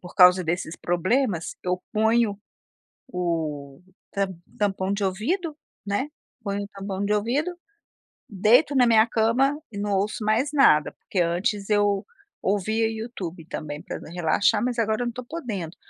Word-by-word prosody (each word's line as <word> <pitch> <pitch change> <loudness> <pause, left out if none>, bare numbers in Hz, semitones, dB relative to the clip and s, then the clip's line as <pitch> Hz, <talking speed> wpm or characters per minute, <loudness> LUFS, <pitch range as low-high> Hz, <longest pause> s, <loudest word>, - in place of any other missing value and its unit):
por 180 - -11
causa 180 0 +7
desses 170 -1 -2
problemas, 180 +1 0
eu 180 0 0
ponho 220 -1 +2 0.7
o 160 - -3 0.3
tam 195 -3 -2 0.2
tampão 195 -2 0
de 200 0 -2
ouvido, 295 - -1 0.3
né, 205 +8 -1 0.3
ponho 200 -1 -2
o - - -7
tampão 195 -1 -5
de 210 - +1
ouvido, 245 +11 0 0.8
deito 235 - +4
na 250 -2 +5
minha 220 -1 +6
cama 250 +6 +2
e 200 - -8
não 205 0 -2
ouço 205 +3 -1
mais 230 +7 +2
nada. 155 - +5
Porque 190 - -4
antes 195 +5 0
eu 205 -1 +2 0.4
ouvia 215 +3 +1
YouTube 200 -7 -6
também 150 -3 -6
pra - - -6
d - - -11
relaxar, 200 +6 +2
mas, 245 -1 -1
agora 220 0 +1
eu - - 0
não 240 - 0
estou 250 +1 -8
podendo. 220 - -5
205 Hz, 155 wpm, -25 LUFS, 180-230 Hz, 0.8 s, causa